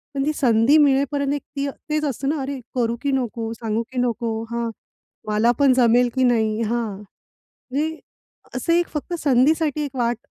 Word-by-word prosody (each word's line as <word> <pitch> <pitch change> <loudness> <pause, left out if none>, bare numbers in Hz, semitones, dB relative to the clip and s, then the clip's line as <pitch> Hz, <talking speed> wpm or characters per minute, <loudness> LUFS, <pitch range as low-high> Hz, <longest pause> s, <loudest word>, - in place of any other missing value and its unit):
पण 275 0 0
ती 305 - +2
संधी 240 +3 +4
मिळेपर्यंत 280 0 +2
एक 290 - -2 0.2
ती 275 - 0 0.2
तेच 305 0 0
असतं 275 0 -2
ना, 310 - +1
अरे, 270 0 -4 0.2
करू 235 -2 +1
की 280 - 0
नको, 235 -4 -2
सांगू 225 0 -2
की 260 - -8
नको, 235 -1 -1 0.2
हां. 235 0 -2 0.6
मला 215 +3 +3
पण 275 -2 +5
जमेल 245 0 +4
की 260 - +2
नाही? 220 -3 +2
हां. 225 -2 -2 0.7
म्हणजे 315 +4 -1 0.6
असं 335 +7 0
एक 345 0 +2
फक्त 305 +3 -4
संधीसाठी 300 +3 +2
एक 270 - -8
वाट 240 -2 0
255 Hz, 175 wpm, -22 LUFS, 235-285 Hz, 0.7 s, पण